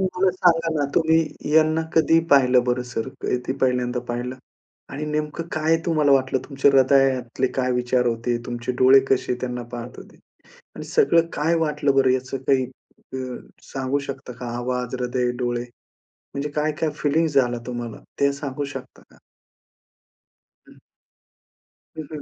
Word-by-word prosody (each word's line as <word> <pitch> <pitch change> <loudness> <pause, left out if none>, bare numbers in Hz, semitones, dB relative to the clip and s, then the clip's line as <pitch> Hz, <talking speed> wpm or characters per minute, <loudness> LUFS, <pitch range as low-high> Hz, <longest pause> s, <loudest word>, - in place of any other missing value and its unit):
मला 185 0 +1
सांगा 170 -2 +2
ना 145 - +1
तुम्ही 160 -1 +4 0.3
यांना 160 0 +4
कधी 160 0 +4
पाहिलं 125 -3 +5
बरं 125 0 0
सर 115 +3 -3
कधी 125 +1 -1
पहिल्यांदा 125 -1 +1
पाहिलं? 120 +2 -3 0.5
आणि 145 +3 -5
नेमकं 150 +2 -3
काय 155 +1 +2
तुम्हाला 155 -4 +2
वाटलं 130 -1 +2
तुमच्या 140 0 +3
हृदयातले 130 -2 +3
काय 130 -1 +1
विचार 125 0 +1
होते? 120 +1 -1
तुमचे 120 0 -3
डोळे 130 +1 +7
कसे 130 -1 +1
त्यांना 125 -1 -3
पाहत 120 +1 -7
होते? - - -13 0.6
आणि - - -6
सगळं 170 - +3
काय 160 +3 +1
वाटलं 145 -2 0
बरं 135 -1 +4
याचं 130 +1 -2
काही 135 -2 +3 0.5
अ, - - -2 0.5
सांगू 135 +1 -2
शकता 135 -2 -7
का? 125 - -5
आवाज, 125 0 -3
हृदय, 125 0 0
डोळे. 120 -1 -1 0.7
म्हणजे 140 +1 -2
काय-काय 155 +1 0
फिलिंग्स 155 +1 +1
झाला 120 -3 +2
तुम्हाला 120 -2 -5 0.2
ते 140 0 +3
सांगू 140 0 -4
शकता 135 -2 -9
का? - - -21 1.5
हं. - - -18 1.2
हं, 155 - -4
हं. 150 - -5
135 Hz, 145 wpm, -23 LUFS, 125-150 Hz, 1.5 s, डोळे